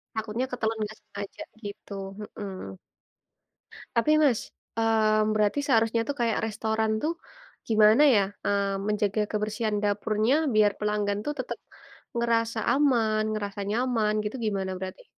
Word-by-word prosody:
Takutnya 220 Hz, +3 st, -2 dB
ketelen 225 Hz, -2 st, -1 dB
nggak 215 Hz, +1 st, -6 dB
sengaja 200 Hz, 0 st, -8 dB, 0.2 s
gitu, 205 Hz, 0 st, -8 dB, 0.3 s
heeh. 195 Hz, -, -7 dB, 1.2 s
Tapi 235 Hz, +6 st, +3 dB
Mas, 255 Hz, -7 st, +3 dB, 0.4 s
mmm, 215 Hz, -1 st, +3 dB
berarti 210 Hz, +5 st, +2 dB
seharusnya 230 Hz, -3 st, +3 dB
tuh 285 Hz, -, -2 dB
kaya 230 Hz, -2 st, +2 dB
restoran 220 Hz, 0 st, -1 dB
tuh, 320 Hz, +2 st, +1 dB, 0.5 s
gimana 215 Hz, +4 st, +6 dB
ya, 205 Hz, -, +5 dB, 0.2 s
mmm, 200 Hz, 0 st, 0 dB
menjaga 210 Hz, 0 st, +1 dB
kebersihan 215 Hz, +1 st, -1 dB
dapurnya 215 Hz, +3 st, +1 dB, 0.2 s
biar 210 Hz, -1 st, +5 dB
pelanggan 210 Hz, -1 st, 0 dB
tuh 295 Hz, -, -1 dB
tetap 255 Hz, -, -4 dB, 0.6 s
ngerasa 230 Hz, -1 st, +1 dB
aman, 235 Hz, -7 st, +3 dB
ngerasa 205 Hz, -2 st, -3 dB
nyaman, 225 Hz, -1 st, +1 dB
gitu 210 Hz, +4 st, -4 dB
gimana 195 Hz, -3 st, -1 dB
berarti? 190 Hz, -, -7 dB
215 Hz, 125 wpm, -27 LUFS, 205-230 Hz, 1.2 s, gimana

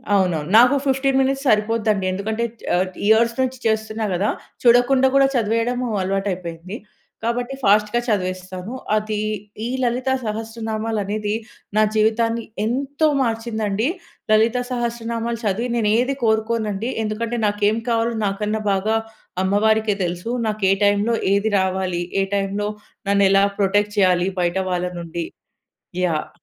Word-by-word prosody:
అవునవును. 175 Hz, -5 st, +1 dB
నాకు 245 Hz, +4 st, +7 dB
15 270 Hz, 0 st, +2 dB
మినిట్స్ 270 Hz, +1 st, 0 dB
సరిపోద్దండి. 215 Hz, -3 st, +2 dB
ఎందుకంటే 215 Hz, +4 st, -2 dB, 0.3 s
ఆహ్, 180 Hz, +1 st, +2 dB, 0.2 s
ఇయర్స్ 230 Hz, +2 st, +4 dB
నుంచి 260 Hz, 0 st, -1 dB
చేస్తున్నా 220 Hz, 0 st, 0 dB
గదా! 195 Hz, +4 st, +1 dB, 0.3 s
చూడకుండా 250 Hz, +2 st, +5 dB
గూడా 275 Hz, 0 st, +6 dB
చదివేయడం 230 Hz, +2 st, +1 dB, 0.2 s
అలవాటైపోయింది. 185 Hz, -2 st, -3 dB, 0.5 s
కాబట్టి 240 Hz, +3 st, -1 dB
ఫాస్ట్‌గా 210 Hz, +2 st, +3 dB
చదివేస్తాను. 185 Hz, 0 st, -3 dB, 0.2 s
అదీ 215 Hz, 0 st, -1 dB, 0.5 s
ఈ -, -, -1 dB, 0.2 s
లలిత 250 Hz, +2 st, 0 dB, 0.2 s
సహస్రనామాలనేది 215 Hz, -1 st, -3 dB, 0.4 s
నా -, -, +6 dB
జీవితాన్ని 225 Hz, +2 st, +2 dB, 0.2 s
ఎంతో 275 Hz, +6 st, 0 dB
మార్చిందండి. 225 Hz, -2 st, -1 dB, 0.4 s
లలిత 220 Hz, +3 st, +4 dB
సహస్రనామాలు 235 Hz, -1 st, -2 dB
చదివి 215 Hz, +5 st, 0 dB
నేను 220 Hz, -3 st, +1 dB
ఏది 260 Hz, +3 st, 0 dB
కోరుకోనండి. 220 Hz, 0 st, 0 dB
ఎందుకంటే, 225 Hz, +2 st, -2 dB
నాకేం 205 Hz, +1 st, +1 dB
కావాలో 230 Hz, 0 st, +1 dB
నాకన్నా 210 Hz, +2 st, -1 dB
బాగా 200 Hz, +3 st, +1 dB, 0.5 s
అమ్మవారికే 215 Hz, +2 st, +2 dB
తెలుసు. 175 Hz, +4 st, -3 dB, 0.2 s
నాకు 215 Hz, -1 st, -3 dB
ఏ -, -, +6 dB
టైమ్‌లో 205 Hz, +3 st, +2 dB, 0.2 s
ఏది 205 Hz, +2 st, +1 dB
రావాలి. 185 Hz, -2 st, -1 dB, 0.2 s
ఏ -, -, +2 dB
టైమ్‌లో 200 Hz, +1 st, -1 dB, 0.4 s
నన్ను 200 Hz, 0 st, +4 dB
ఎలా 195 Hz, 0 st, +5 dB, 0.2 s
ప్రొటెక్ట్ 205 Hz, +1 st, +1 dB
చేయాలి. 185 Hz, -2 st, +3 dB
బయట 175 Hz, +1 st, 0 dB
వాళ్ళ 180 Hz, 0 st, 0 dB
నుండి. 170 Hz, 0 st, -4 dB, 0.8 s
యాహ్! 160 Hz, -3 st, -1 dB
215 Hz, 125 wpm, -21 LUFS, 195-235 Hz, 0.8 s, నాకు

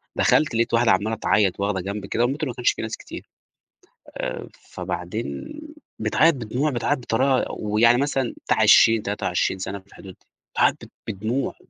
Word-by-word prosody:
دخلت 145 Hz, -6 st, +2 dB
لقيت 115 Hz, +1 st, 0 dB
واحدة 115 Hz, 0 st, +4 dB
عمّالة 105 Hz, +4 st, +1 dB
تعيط، 100 Hz, -3 st, +1 dB
واخدة 100 Hz, -1 st, -1 dB
جنب 100 Hz, +2 st, -5 dB
كده، 115 Hz, -, 0 dB
والمترو 140 Hz, +4 st, -1 dB
ما 120 Hz, -, -6 dB
كانش 125 Hz, -, +2 dB
فيه -, -, -6 dB
ناس 110 Hz, 0 st, -4 dB
كتير -, -, -10 dB, 0.9 s
آآ، -, -, -4 dB
فبعدين 90 Hz, -, -6 dB, 0.4 s
بتعيط 150 Hz, +9 st, +3 dB
بدموع، 125 Hz, +5 st, -2 dB
بتعيط 135 Hz, +3 st, 0 dB
بطريقة 130 Hz, +2 st, +1 dB
ويعني 110 Hz, +3 st, +3 dB
مثلًا 135 Hz, -3 st, -1 dB
بتاع -, -, +1 dB
20 110 Hz, -1 st, +6 dB
23 95 Hz, -2 st, -1 dB
سنة 95 Hz, +1 st, -5 dB
في 95 Hz, -, -25 dB
الحدود 95 Hz, -1 st, -12 dB
دي، -, -, -32 dB, 0.3 s
بتعيط -, -, +2 dB
ب -, -, -18 dB, 0.2 s
بدموع. 110 Hz, +7 st, -2 dB
115 Hz, 165 wpm, -23 LUFS, 100-125 Hz, 0.9 s, 20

